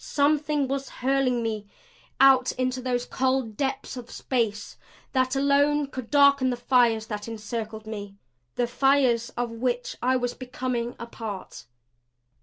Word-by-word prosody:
Something 295 0 +1
was 275 +1 -3
hurling 255 -2 0
me 215 -2 -3 0.5
out 265 -2 +6
into 255 0 -1
those 245 -1 -1
cold 260 -4 0
depths 270 +2 -2
of 245 -2 -8
space 225 -5 -2 0.4
that 260 0 +1
alone 285 +2 +3
could 255 -4 -7
darken 280 -2 +5
the 245 - -1
fires 240 -3 +3
that 210 -1 -5
encircled 220 0 -5
me 205 -2 -7 0.4
the 245 - +1
fires 250 -2 +2
of 240 -1 -1
which 245 +1 -2
I 255 +1 +2
was 245 -1 -1
becoming 250 -2 -3
a 235 - -6
part. 220 -4 -8
250 Hz, 140 wpm, -26 LUFS, 230-270 Hz, 0.5 s, out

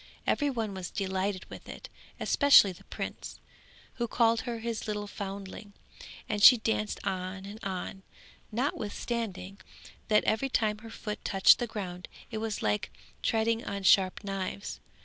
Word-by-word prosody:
Every 290 -1 +2
one 225 -6 -2
was 185 -2 -5
delighted 190 -1 -2
with - - -11
it, - - -8 0.3
especially 285 -9 +6
the 180 - -14
prince, - - -6 0.6
who 235 -1 -1
called 230 0 +3
her 240 -2 -4
his 225 0 -4
little 210 -1 -2
foundling; 200 0 -7 0.5
and 210 - -2
she 250 +4 +10
danced 220 -1 -1
on 185 +1 -3
and 210 +2 -9
on, 190 0 -4 0.5
notwithstanding 210 -5 -3 0.5
that 210 -1 +4
every 270 +5 +1
time 215 -4 +1
her 225 +1 -11
foot 210 -1 -6
touched 195 -1 +6
the 240 - -1
ground 180 -5 -6 0.2
it 220 - -3
was 220 -1 -3
like 210 -2 0 0.3
treading 225 0 +1
on 200 -1 -4
sharp 190 +1 +4
knives. 195 0 -4
210 Hz, 150 wpm, -30 LUFS, 195-225 Hz, 0.6 s, she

